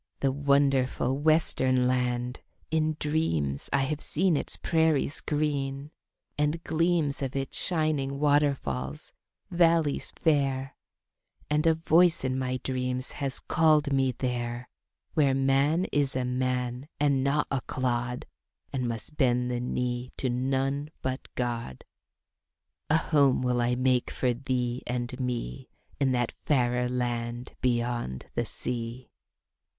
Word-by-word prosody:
"The 135 - +2
wonderful 140 -2 +2
western 140 -5 +2
land; 125 0 0 0.3
in 155 -1 +1
dreams 80 - -1
I 140 - +3
have 150 +2 -2
seen 175 +1 +1
its - - -1
prairies 160 -3 +1
green, 145 -1 -2 0.5
and 150 +3 0
gleams 165 -3 +1
Of 135 -1 -3
its 135 0 -3
shining 155 -5 0
waterfalls, 140 - 0 0.4
valleys 165 -4 +3
fair, 135 -4 +1 0.8
And 150 +2 +2
a 160 - +5
voice 165 +1 +4
in 130 0 0
my 130 0 -1
dreams 130 0 -2
has 135 -2 -3
called 155 -3 +3
me 135 -1 +3
there 120 0 -3 0.4
Where 140 -5 +3
man 135 +6 +2
is 140 -3 +1
a 130 -1 0
man, 125 +1 -1
and 140 -2 +2
not 140 +2 +2
a 135 -2 0
clod, 125 -1 -2 0.5
And 130 -3 -1
must 115 +6 -6
bend 125 -2 +2
the 120 - -1
knee 125 0 -2
to 130 - -1
none 135 +3 -1
but 130 0 -3
God. 115 - -3 1.1
A 155 - +5
home 140 -5 +3
will 125 -1 +1
I 120 +1 +1
make 125 -1 +2
for 125 -2 0
thee 125 -1 -2
and 125 +1 -3
me 120 - -3 0.3
In 135 -2 +2
that 120 -2 0
fairer 125 -3 +2
land 120 -1 -3
beyond 120 - -1
the - - -1
sea." 120 +1 -5
130 Hz, 130 wpm, -28 LUFS, 125-145 Hz, 1.1 s, a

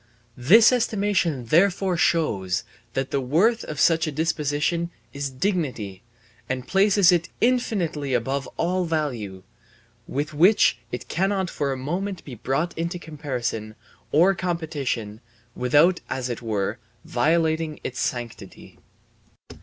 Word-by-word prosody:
This 220 - +7
estimation 200 - 0
therefore 180 - +3
shows 100 - +1 0.3
that 135 0 -2
the 140 - 0
worth 185 - +2
of 150 -1 -6
such 165 -1 +3
a - - -2
disposition 155 +2 0 0.2
is 140 0 -3
dignity, 130 - -2 0.5
and 130 -1 -3
places 195 -1 +4
it 170 -1 +1
infinitely 185 - 0
above 135 +3 -1
all 180 +2 0
value, 120 - -3 0.6
with 145 +3 -3
which 165 - +4
it 125 - -5
cannot 190 0 0
for 140 -2 -1
a 135 - -2
moment 180 +8 -4
be 135 - -8
brought 135 +9 -2
into 170 +2 -3
comparison 125 -9 -4 0.4
or 175 +6 +5
competition 150 - -3 0.3
without 150 +9 +3
as 130 0 -3
it 120 - -4
were 110 0 -2 0.3
violating 160 +3 +1
its 125 - -5
sanctity. 115 -6 -5
155 Hz, 120 wpm, -24 LUFS, 125-175 Hz, 0.6 s, This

